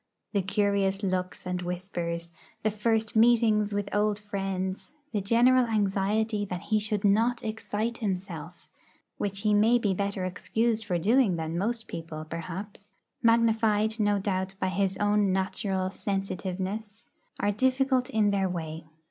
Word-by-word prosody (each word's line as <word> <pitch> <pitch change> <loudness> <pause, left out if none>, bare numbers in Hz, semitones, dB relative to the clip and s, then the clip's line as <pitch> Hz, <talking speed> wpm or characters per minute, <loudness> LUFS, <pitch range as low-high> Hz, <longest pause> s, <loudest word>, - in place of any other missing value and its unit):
The 200 - +2
curious 200 0 +1
looks 185 -1 -2
and 180 0 -2
whispers, 175 -2 -4 0.3
the 215 - +2
first 220 +1 0
meetings 220 -2 +4
with 200 0 -1
old 210 0 +2
friends, 195 -2 -4 0.2
the 210 - 0
general 240 +4 +4
anxiety 210 0 +1
that 180 -3 -4
he 215 - +5
should 210 -1 -2
not 225 +4 +3
'excite 220 +1 -3
himself' 180 -5 -4 0.5
(which 200 -1 -2
he 210 -1 +2
may 220 +4 +5
be 210 -5 +1
better 200 0 -2
excused 220 +4 -1
for 180 -4 0
doing 215 +2 +3
than 160 0 -3
most 225 +5 -1
people, 160 -2 -6
perhaps), 185 +5 -7 0.3
magnified, 225 -1 +3
no 205 -1 +3
doubt, 190 -1 -2
by 185 - 0
his 195 +1 0
own 205 -1 +2
natural 190 0 -1
sensitiveness, 195 +2 -4 0.3
are 205 - +2
difficult 260 +3 +2
in 210 -2 +2
their 195 -1 +1
way. 160 -2 -5
205 Hz, 140 wpm, -28 LUFS, 185-220 Hz, 0.5 s, he